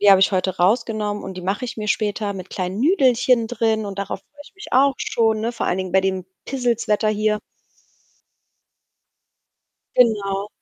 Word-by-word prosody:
die 205 0 +6
habe 195 -1 +7
ich 195 - +5
heute 185 0 0
rausgenommen 210 +1 +1
und 190 - -6
die - - -5
mache 195 +7 -2
ich 235 - -6
mir 210 0 -3
später 205 0 -1
mit 185 -1 -8
kleinen 185 +1 -3
Nüdelchen 255 - +3
drin 220 -2 0
und 195 -1 -7
darauf 200 0 -4
freue 290 0 -21
ich - - -17
mich 415 - -10
auch 270 +1 +4
schon, 220 -2 +1
ne, 230 +2 -2
vor 235 - -3
allen 180 - 0
Dingen 185 -1 -4
bei 190 - +4
dem 190 -1 -1 0.2
Pissels-Wetter 235 -5 0
hier. 215 0 +1 2.6
Genau. 205 -4 +2
210 Hz, 175 wpm, -21 LUFS, 195-235 Hz, 2.6 s, habe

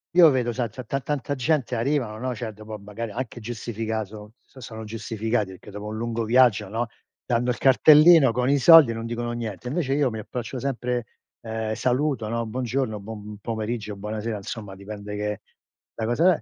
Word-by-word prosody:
io 175 -3 +9
vedo 125 -4 +1
sa 120 -1 -2
ta 125 +4 -8
ta 135 +4 -2
tanta 145 +1 -2
gente 135 -1 0
arrivano, 120 -2 -1
no, 130 +2 -3
cioè 115 -2 -5
dopo 110 +1 -9
magari 105 +2 -6
anche 120 +1 -5
giustificato 110 -2 -5
son 130 - -15
sono 110 -2 -8
giustificati 110 -1 -2
perché 95 +2 -13
dopo 105 +1 -7
un 110 +1 -5
lungo 115 0 -2
viaggio, 115 -3 +4
no, 115 +3 -2 0.4
dando 120 0 +1
il 120 - -3
cartellino 150 +2 +7
con 125 +2 0
i 140 - +4
soldi, 150 -3 +8
non 115 0 -5
dicono 120 0 -3
niente; 115 -1 -5
invece 135 0 -1
io 145 -2 +2
mi 110 -2 -5
approccio 125 +3 -5
sempre, 125 -2 -2 0.4
ehm, 110 -1 -3
saluto, 125 -1 0
no: 115 0 -1
"Buongiorno. 120 -1 -2
Buon 105 0 -8
pomeriggio. 110 -1 -3
Buonasera", 105 +2 -4
insomma 100 0 -7
dipende 105 +1 -7
che 105 -1 -3 0.5
da 110 - -3
cosa 165 +10 +4
è - - -9
115 Hz, 185 wpm, -25 LUFS, 110-130 Hz, 0.5 s, io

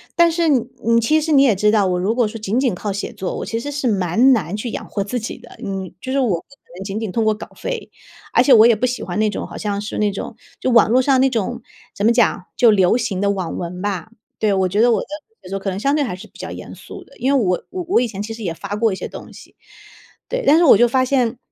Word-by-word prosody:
但 340 0 +5
是 335 -1 +1
你 230 -3 +1
其 310 +7 +2
实 315 +1 -2
你 275 - +6
也 240 -7 +4
知 210 +2 +2
道， 210 -3 +3
我 180 - 0
如 195 +5 0
果 240 -4 +2
说 225 +2 -7
仅 215 +4 -1
仅 250 -9 +1
靠 205 +3 -4
写 200 +1 -4
作， 185 - -4
我 - - -4
其 230 - -3
实 290 +4 -5
是 280 -3 -2
蛮 210 +6 +3
难 185 -5 -1
去 235 +2 -4
养 - - -5
活 200 - -2
自 245 +5 -3
己 225 - -6
的。 - - -15
嗯， 195 -3 -5
就 260 - -5
是 275 - +1
我 255 - +2
不 170 -4 0
可 275 - -22 0.2
能 190 - -5
仅 200 +2 -4
仅 220 -4 -4
通 225 +3 0
过 215 0 +3
稿 215 - -9
费， - - -5 0.4
而 - - +5
且 270 - +5
我 225 0 +8
也 235 - +5
不 230 - 0
喜 250 -1 -2
欢 - - -4
那 215 - +2
种 - - -5
好 - - -9
像 205 -1 -2
是 210 +1 -5
那 210 -1 +2
种， 200 - -6 0.2
就 - - -1
网 230 -2 +5
络 255 +2 +4
上 260 -1 +3
那 270 - +4
种 240 0 -2 0.3
怎 200 - -1
么 230 - +5
讲， 230 -6 +2
就 235 -3 +6
流 190 +2 +3
行 195 -6 -2
的 200 0 +2
网 185 -4 -4
文 180 +1 -5
吧。 205 +1 -3 0.3
对， 210 -2 +2
我 190 -1 +2
觉 205 +4 +1
得 240 - +5
我 220 - +2
的 - - -8 0.4
写 - - -11
作 195 - -2
可 195 - -3
能 190 - -4
相 280 +6 +1
对 300 - +1
还 235 -9 -3
是 185 - -12
比 - - -20
较 - - -6
严 - - -9
肃 - - -11
的， - - -20
因 265 +3 +1
为 270 - +3
我 180 0 0
我 360 -6 0
以 245 - 0
前 200 -2 -6
其 225 +2 -5
实 225 - -8
也 175 -4 -2
发 200 +4 -6
过 225 0 +1
一 190 - -2
些 - - -5
东 - - -10
西。 - - -15 0.7
对， - - -2
但 305 - +7
是 345 - +4
我 265 - +8
就 240 +1 +5
发 255 +2 +2
现 250 -3 0
225 Hz, 320 characters per minute, -19 LUFS, 200-255 Hz, 0.7 s, 我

